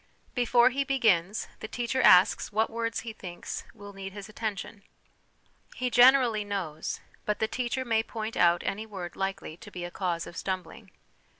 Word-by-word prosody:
Before 245 0 +4
he 275 +2 0
begins, 215 -8 +2
the 220 - -6
teacher 245 +3 -1
asks 185 0 +6
what 220 +2 +1
words 230 0 -2
he 230 -2 -7
thinks 180 -4 -7
will 205 -2 -11
need 195 -1 -7
his 205 0 -8
attention. 215 -1 -5 0.9
He 250 -1 -2
generally 245 -3 +6
knows, 185 -7 -4 0.2
but 210 - -1
the 220 - 0
teacher 255 +2 -2
may 225 -2 +2
point 225 0 -5
out 175 0 +4
any 215 +3 -3
word 185 -5 -7
likely 195 -4 -4
to - - -12
be 180 - -7
a 175 - -7
cause 175 -3 -2
of 170 - -10
stumbling. 185 +3 -5
215 Hz, 170 wpm, -28 LUFS, 185-235 Hz, 0.9 s, asks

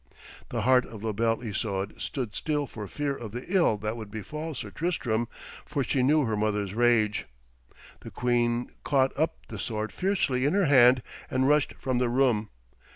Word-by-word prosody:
The - - -2
heart 130 0 +4
of 110 -2 -10
La 110 - 0
Belle 115 +2 0
Isoude 100 -2 -3
stood 125 -7 -3
still 150 -2 -1
for 105 -4 -7
fear 145 +5 -2
of 110 -5 -8
the 125 +1 -5
ill 175 - +3
that 110 +2 -3
would 110 -3 -7
befall 150 - -5
Sir - - -6
Tristram, 120 -9 -1 0.4
for 140 - -2
she 130 +2 0
knew 150 +4 +4
her 110 -4 0
mother's 105 -2 -1
rage. 110 -2 +2 0.7
The - - -9
queen 120 0 0
caught 135 -2 +2
up 160 +3 0
the 110 - -6
sword 110 +1 -3
fiercely 180 -10 0
in 145 - +2
her 200 -2 +3
hand 125 -3 +6 0.3
and 130 0 +1
rushed 150 0 +3
from 130 -2 -1
the 125 -1 +1
room. 120 -4 +2
120 Hz, 180 wpm, -28 LUFS, 110-140 Hz, 0.7 s, hand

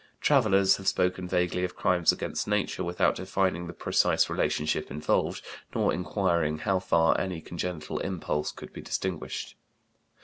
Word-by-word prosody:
Travellers 100 -9 +4
have 95 - -8
spoken 90 0 +1
vaguely 90 0 0
of 90 - -3
crimes 90 -2 +3
against - - -3
nature - - 0
without 85 0 +2
defining 95 -2 -1
the 85 - -7
precise - - +2
relationship 75 +1 0
involved 75 +3 -1 0.3
nor - - +2
inquiring 85 -4 0
how 95 +4 0
far 85 -2 +3
any 90 -3 -3
congenital 85 -1 -4
impulse 80 -5 -2
could - - -11
be - - -8
distinguished. 95 -4 -4
90 Hz, 140 wpm, -28 LUFS, 85-95 Hz, 0.3 s, Travellers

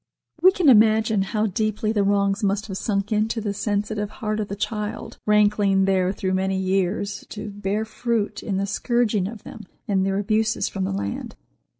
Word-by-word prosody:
We 370 +2 +8
can 365 -4 0
imagine 220 -3 +5
how 210 +3 0
deeply 215 +1 -1
the 210 -2 +1
wrongs 200 +1 +1
must 200 +1 0
have 195 -3 -5
sunk 200 -1 -1
into 220 +2 +1
the 205 -2 -2
sensitive 210 0 -2
heart 215 0 -3
of 210 - -2
the 200 - -5
child, 210 +1 -4
rankling 205 -2 +3
there 190 -1 +2
through 190 -1 -2
many 190 0 0
years, 190 +2 -1
to 210 0 -6
bear 205 +2 -2
fruit 220 -1 -2
in 195 -3 -2
the 195 - 0
scourging 215 -1 0
of 215 0 -9
them 210 -4 -10 0.2
and 195 -2 +1
their 195 0 0
abuses 215 +2 +1
from 95 - -3
the 95 - -2
land. 100 +1 -4
205 Hz, 185 wpm, -23 LUFS, 195-215 Hz, 0.2 s, We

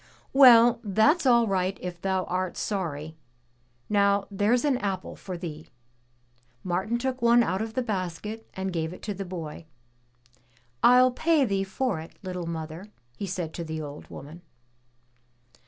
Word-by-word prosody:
"Well, 240 -4 +8
that's 235 - +3
all 235 -2 +5
right 190 -2 0
if 175 -1 -7
thou 190 -1 0
art 185 0 -3
sorry! 160 -6 -3 0.7
Now 200 -1 +2
there's 215 +7 +2
an 270 -4 +2
apple 195 -2 -3
for 185 -2 -7
thee.'' 160 -3 -8 0.9
Martin 190 +6 -1
took 260 +1 -3
one 235 0 +5
out 190 -2 -1
of 220 0 -5
the 255 - 0
basket 210 +1 -4
and 190 -1 -3
gave 160 0 -2
it - - -13
to 210 - -3
the 195 0 -6
boy. 165 -3 -7 1.1
"I'll 250 +1 +6
pay 310 +2 +2
thee 195 -3 0
for 195 -1 -2
it, 160 - -11
little 180 -2 -5
mother," 165 +3 -6 0.3
he 200 - -5
said 175 -3 -4
to 170 - -5
the 160 -1 -5
old 145 0 -9
woman. 155 +5 -10
195 Hz, 155 wpm, -27 LUFS, 175-230 Hz, 1.1 s, Well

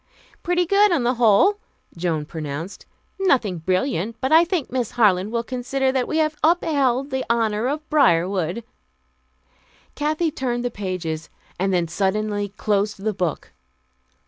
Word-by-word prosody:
"Pretty 355 0 +1
good, 400 +3 +4
on 325 -8 +1
the 245 +1 +2
whole," 245 - +4 0.4
Joan 165 -3 -2
pronounced. 155 +3 -6 0.3
"Nothing 240 - +1
brilliant, 185 - -1
but 260 - -2
I 325 +2 +7
think 345 -4 -2
Miss 245 -3 -1
Harland 205 -3 +3
will 235 0 -1
consider 260 +2 -1
that 260 -2 -1
we 315 - -1
have 310 -1 +1
upheld 285 -5 +2
the 265 0 -1
honor 225 -1 +1
of 300 +3 -3
Briarwood." 185 - +2 1.3
Kathy 310 +2 -1
turned 245 -3 -2
the 245 - -1
pages, 180 -6 -4 0.3
and 195 +1 +1
then 175 -2 +1
suddenly 205 +3 -1
closed 205 0 -1
the 215 0 0
book. 180 -4 -3
235 Hz, 145 wpm, -22 LUFS, 190-280 Hz, 1.3 s, I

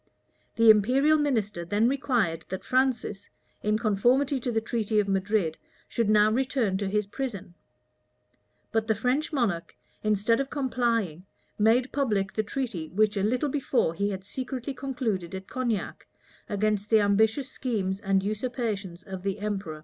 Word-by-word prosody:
The 230 -1 +8
imperial 265 +9 +4
minister 220 -11 0
then 205 +6 +2
required 240 - 0
that 190 +1 -5
Francis, 250 -6 0 0.3
in 210 0 +1
conformity 245 +6 +2
to 245 0 -2
the 225 - +1
treaty 220 -1 0
of 205 - +1
Madrid, 195 -3 0 0.3
should 230 -3 0
now 215 0 +5
return 250 -4 0
to 200 -1 -1
his 210 +1 0
prison; 205 -5 -5 1.2
but 225 -1 0
the 220 - +2
French 250 +9 0
monarch, 220 - -1 0.3
instead 215 +2 +2
of 275 0 -2
complying, 230 - -1 0.3
made 235 +5 +3
public 215 -8 0
the 215 - +1
treaty 215 - -4
which 210 +2 +2
a 200 - 0
little 250 +8 +1
before 260 - +1
he 200 +4 -1
had 190 -2 -5
secretly 260 +4 -4
concluded 235 -9 -3
at 190 0 -7
Cognac, 240 -5 -3 0.4
against 210 0 0
the 220 - +6
ambitious 220 +6 +2
schemes 195 -7 -2
and 195 -2 +1
usurpations 210 -4 -3
of 190 -1 -7
the 195 +1 -2
emperor. 200 -7 -4
215 Hz, 150 wpm, -27 LUFS, 195-250 Hz, 1.2 s, The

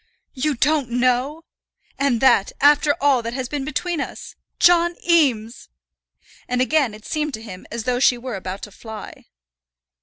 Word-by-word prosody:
You 290 +2 -1
don't 285 0 +1
know! 250 +6 0 0.6
And 270 -5 +1
that, 235 -7 +4
after 290 +1 +4
all 275 -3 +3
that 230 +1 -5
has 260 -2 -3
been 285 +1 -4
between 305 +3 -2
us! - - -7 0.3
John 345 0 +4
Eames!" 250 - +1 0.8
And 250 0 -1
again 255 -3 +1
it 215 - -15
seemed 305 -2 -2
to 220 - -11
him 185 -5 -10
as 230 0 -4
though 245 +1 0
she 250 -1 +4
were 250 0 -6
about 190 +1 -6
to 210 - -8
fly. 220 +1 -10
255 Hz, 160 wpm, -21 LUFS, 235-295 Hz, 0.8 s, that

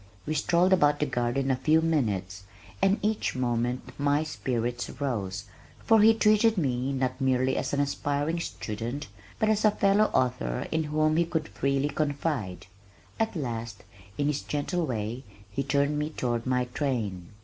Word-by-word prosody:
We 155 - -1
strolled 170 +5 +3
about 145 -5 +4
the 150 - +2
garden 130 +1 0
a - - +3
few 155 +5 +3
minutes 105 - -1 0.4
and 195 +2 +4
each 215 -7 0
moment 125 0 -1
my 145 +1 +2
spirits 120 -5 -2
rose, 100 -9 -2 0.4
for 225 -1 +6
he 225 +1 +7
treated 215 0 +4
me, 130 -4 0
not 130 0 -2
merely 130 0 +2
as - - -2
an 140 - 0
aspiring 145 +3 -1
student, 120 -1 -5 0.3
but 215 - +1
as 215 -1 +2
a 215 - +7
fellow 205 0 +3
author 125 - 0
in 160 0 0
whom 155 +1 +1
he 170 - +3
could 160 -2 -2
freely 140 +1 0
confide. 145 - -2 0.5
At 225 -2 0
last, 115 - -4 0.3
in 145 - 0
his 145 0 0
gentle 160 +3 -2
way, 115 +1 -3 0.3
he 120 - -1
turned 140 +2 +1
me 150 +1 -1
toward 120 -5 -2
my 125 -1 +1
train. 115 - -2
140 Hz, 160 wpm, -28 LUFS, 120-160 Hz, 0.5 s, he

